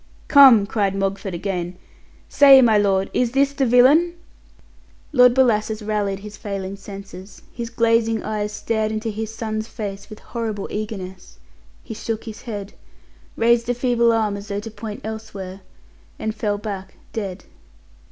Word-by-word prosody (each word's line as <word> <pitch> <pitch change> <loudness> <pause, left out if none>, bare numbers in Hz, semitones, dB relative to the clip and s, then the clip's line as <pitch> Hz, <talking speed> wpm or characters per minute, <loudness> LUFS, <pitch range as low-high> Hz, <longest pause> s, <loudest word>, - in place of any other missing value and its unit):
"Come," 265 -8 +8
cried 200 -2 -1
Mogford 195 -1 -2
again; 180 -1 -4 0.5
"say, 275 -2 +7
my 235 -4 +5
lord, 195 -2 +2
is 245 -1 0
this 275 +1 +2
the 275 -2 0
villain?" 285 +9 +5 1.0
Lord 250 -2 +6
Bellasis 220 -4 +2
rallied 205 -2 -2
his 210 0 -10
failing 195 -1 -5
senses, 195 -1 -11
his 235 -1 -5
glazing 230 -1 +1
eyes 210 -1 -3
stared 215 0 -2
into 220 +1 -3
his 220 +1 -5
son's 220 -1 -4
face 205 -3 -7
with 215 - -9
horrible 220 -4 -5
eagerness; 190 -4 -6 0.5
he 225 - -7
shook 225 0 -4
his 220 -2 -9
head, 205 -4 -7 0.6
raised 235 +1 +2
a 245 - +1
feeble 240 -1 +2
arm 220 -3 0
as 200 +1 -9
though 200 -1 -3
to 225 +1 -8
point 215 -1 -7
elsewhere, 200 -3 -7 0.6
and 220 - -3
fell 210 -2 -2
back 195 -2 -7 0.2
dead. 195 -4 -5
215 Hz, 150 wpm, -21 LUFS, 200-230 Hz, 1.0 s, Come